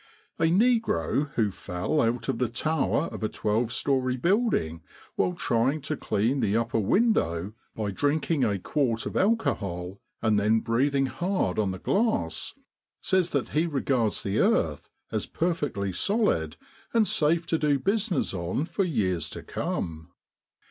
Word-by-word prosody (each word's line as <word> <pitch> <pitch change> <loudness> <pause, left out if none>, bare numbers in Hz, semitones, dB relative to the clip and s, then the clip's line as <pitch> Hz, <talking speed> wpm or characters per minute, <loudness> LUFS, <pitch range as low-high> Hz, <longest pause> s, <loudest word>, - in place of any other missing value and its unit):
A 165 - +3
negro 175 - +2
who 110 -3 +2
fell 90 +12 -2
out 115 0 0
of - - -1
the 125 -3 +1
tower 150 +5 0
of - - -6
a 110 - 0
twelve 110 +3 0
story 130 -1 0
building 170 - +1 0.3
while 180 - +1
trying 135 -2 +1
to 155 +3 -3
clean 120 +2 0
the 105 -3 +1
upper 115 0 0
window 105 - +1 0.2
by 105 -2 -2
drinking 145 - 0
a 100 -2 +1
quart 115 - -1
of - - -5
alcohol 100 - 0 0.2
and 110 -2 +2
then 110 +2 +3
breathing 135 +4 +1
hard 175 - -1
on 105 -2 +1
the 95 - -4
glass, 95 - 0 0.4
says 185 -2 +1
that 140 -3 0
he 160 +3 +1
regards 130 -7 0
the 100 - -1
earth - - +1 0.2
as - - -1
perfectly 145 - -1
solid, 90 - +1 0.4
and 220 -2 +4
safe 165 +2 +2
to 165 -1 0
do 145 -2 +2
business 200 - 0
on 90 - -2
for 195 - -1
years 100 - 0
to - - -8
come. 80 -1 -4
130 Hz, 150 wpm, -27 LUFS, 100-165 Hz, 0.4 s, and